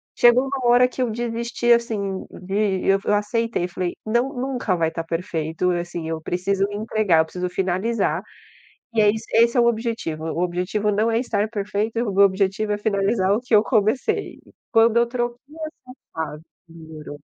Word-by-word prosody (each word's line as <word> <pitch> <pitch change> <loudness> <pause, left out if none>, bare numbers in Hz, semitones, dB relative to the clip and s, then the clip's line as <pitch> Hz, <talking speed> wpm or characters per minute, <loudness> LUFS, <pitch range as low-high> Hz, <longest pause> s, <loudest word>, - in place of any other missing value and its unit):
chegou 240 +1 +5
uma 270 -2 -3
hora 245 +1 +6
que 255 - -6
eu 245 - -1
desisti, 235 +1 -1
assim, 205 -5 -1
de 195 0 -1
eu 195 0 +4
aceitei 210 0 0
e - - -3
falei: 180 0 -3
"Não, 235 +4 +1
nunca 250 -6 -1
vai 165 -2 +1
tá 165 0 -4
perfeito, 165 0 -2
assim, 175 -1 -3
eu 160 -1 -3
preciso 190 +4 0
entregar, 210 -4 +1
eu 160 - +4
preciso 180 +2 -4
finalizar." 190 +5 0 0.7
E 225 - +3
é 210 - +5
isso 220 +1 -6
esse 235 +2 +4
é - - +6
o 235 - +4
objetivo, 225 -9 -2
o 165 +1 -2
objetivo 180 +4 -1
não 215 +3 +1
é 225 - +2
estar 215 -4 -1
perfeito, 210 +1 -2
o - - -4
meu 200 +1 +6
objetivo 195 +2 0
é - - -1
finalizar 200 -1 +1
o 215 - 0
que 250 -1 -6
eu 210 - +6
comecei. 220 +2 0 0.3
Quando 225 0 +4
eu 235 - +5
troquei 240 0 -2 0.3
essa 310 -5 -12 0.2
frase 160 -1 -5 0.3
melhorou. 160 -3 -10
205 Hz, 180 wpm, -22 LUFS, 180-235 Hz, 0.7 s, hora